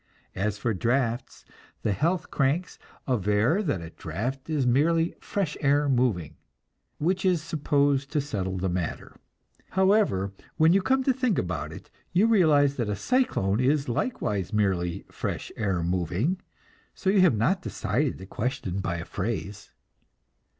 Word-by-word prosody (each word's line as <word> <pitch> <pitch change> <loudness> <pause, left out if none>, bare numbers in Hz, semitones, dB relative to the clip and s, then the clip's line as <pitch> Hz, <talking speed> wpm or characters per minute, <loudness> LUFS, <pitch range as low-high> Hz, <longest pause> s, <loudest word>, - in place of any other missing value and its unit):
As 105 +2 -1
for 115 +1 -1
drafts, 120 +4 -1 0.4
the - - +1
"health 165 - 0
cranks" 145 +6 0 0.3
aver 115 - +2
that 145 - -1
a 80 - -8
draft 125 - -5
is 150 -4 +1
merely 165 +7 +3
"fresh 185 -7 -2
air 145 0 +3
moving"; 120 - 0 0.6
which 185 +5 0
is 185 -3 +3
supposed 145 -3 +1
to 150 - +1
settle 95 -10 -3
the 95 +1 -1
matter. 90 -2 -3 0.5
However, 190 - +2 0.2
when 160 +2 +5
you 195 - +4
come 265 +7 +2
to 265 - +3
think 250 -5 0
about 90 -2 -2
it, - - -11 0.2
you 185 +5 +4
realize 155 -10 +4
that 120 -4 -1
a 105 - 0
cyclone 180 - +1
is 140 +3 +2
likewise 105 - -1
merely 95 -5 0
"fresh - - -4
air 95 -6 -1
moving," 90 - 0 0.5
so 190 - +1
you 200 -1 +4
have 165 -12 +4
not 175 - +2
decided 150 -6 -1
the 95 - -9
question 100 -3 -3
by 90 -3 -2
a 85 0 -5
phrase. 100 -1 -4
130 Hz, 150 wpm, -27 LUFS, -, 0.6 s, when